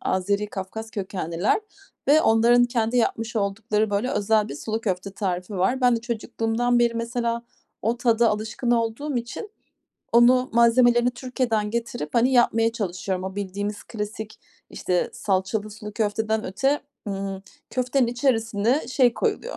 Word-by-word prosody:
Azeri, 200 +3 0
Kafkas 210 +3 -6
kökenliler 185 - -1 0.5
ve 305 +2 +6
onların 235 +1 +5
kendi 240 0 0
yapmış 225 -1 0
oldukları, 210 +1 0
böyle, 205 +6 0
özel 215 -3 +2
bir - - -6
sulu 220 +9 -3
köfte 195 -2 -2
tarifi 185 -1 -3
var. 215 +9 +1
Ben 245 -2 +4
de - - -4
çocukluğumdan 235 +1 -1
beri 235 -1 +2
mesela 235 0 -2 0.4
o 230 +3 +1
tada 235 -1 +3
alışkın 220 +3 -2
olduğum 240 +5 0
için 240 - -5 0.6
onu 250 +2 +5
malzemelerini 240 +1 +5
Türkiye'den 240 -4 -1
getirip, 235 -8 -4
hani, 245 +3 +3
yapmaya 230 -2 +3
çalışıyorum. 190 -4 -3
O 190 0 -5
bildiğimiz 205 +1 -4
klasik, 215 0 -6 0.3
işte, 180 -1 -1
salçalı 200 +2 -1
sulu 210 0 -9
köfteden 220 0 -1
öte, 270 +10 0 0.3
ımm, 195 -1 -4 0.3
köftenin 255 0 +1
içerisine 235 0 +1
şey 255 -2 +3
koyuluyor, - - -2
225 Hz, 140 wpm, -24 LUFS, 205-240 Hz, 0.6 s, ve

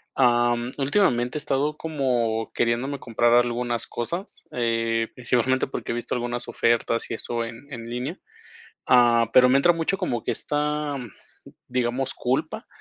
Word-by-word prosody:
Am, 120 -1 +2
últimamente 135 -4 +1
he - - -2
estado 145 +3 0
como 125 -8 -1
queriéndome 120 +4 0
comprar 120 0 +1
algunas 120 0 +1
cosas, 170 - -4
eh, 115 -1 0
principalmente 125 +1 +1
porque, - - -5
he - - -1
visto 120 - -3
algunas 120 0 -3
ofertas 115 0 +1
y - - -1
eso 115 +1 -3
en 115 +4 -9
en 115 -2 -7
línea. 125 +9 -4 0.7
Ah, 120 -2 +5
pero 125 +1 +7
me 130 +2 +4
entra 175 +5 +5
mucho 165 +4 -1
como 120 - -2
que - - -1
esta, 150 0 -2 0.7
digamos 125 +1 -1
culpa 155 - -2
120 Hz, 145 wpm, -24 LUFS, 120-140 Hz, 0.7 s, pero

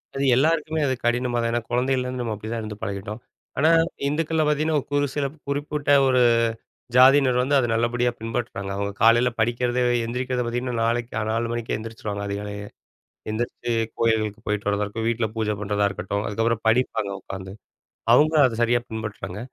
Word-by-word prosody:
அது 135 - -1
எல்லாருக்குமே 155 +2 +1
அது 130 - +1
கடினமாதான், 120 -1 +1
ஏன்னா 120 0 0
குழந்தயிலருந்து 125 0 0
நம்ம 115 -2 -2
அப்படிதான் 110 +2 -5
இருந்து 105 -1 -6
பழகிட்டோம். 100 +3 -4 0.4
ஆனா 155 +4 +4 0.4
இந்துக்கள்ல 160 +2 0
பாத்திங்கன்னா, 155 +1 +1 0.2
ஒரு 145 - +2
சில 145 -1 0 0.2
குறிப்பிட்ட 145 +1 -1 0.2
ஒரு 130 -1 +3 0.7
ஜாதியினர் 130 0 +6
வந்து 140 +3 +1
அத 130 - +3
நல்லபடியா 120 +1 +1
பின்பற்றுறாங்க. 115 -3 -4
அவுங்க 100 0 -2
காலையில 120 +2 +5
படிக்கிறத 120 +2 +1 0.3
எந்திரிக்கிறத 125 +1 -2
பாத்தீங்கன்னா, 125 +1 -2
4க்கே- 120 +1 -1
அ - - -1
4 115 +1 -1
மணிக்கே 120 -1 -2
எந்திரிச்சுருவாங்க 110 -2 -5
அதிகாலயே. 100 0 -5 0.6
எந்திரிச்சு 120 +2 -3 0.3
கோயில்களுக்கு 110 -2 +1
போயிட்டு 105 -1 -1
வர்றதா 105 0 +1
இருக்கட்டும், 110 +2 -3
வீட்டுல 115 -1 0
பூஜ 110 -1 -1
பண்றதா 100 0 +1
இருக்கட்டும். 100 +1 -3
அதுக்கப்புறம் 115 +2 0
படிப்பாங்க 110 -3 +1
உக்காந்து. 95 0 -7 0.6
அவுங்க 155 +5 +4
அத 115 -3 -3
சரியா 120 +1 +3
பின்பற்றுறாங்க. 105 -4 -5
120 Hz, 150 wpm, -24 LUFS, 110-130 Hz, 0.7 s, ஜாதியினர்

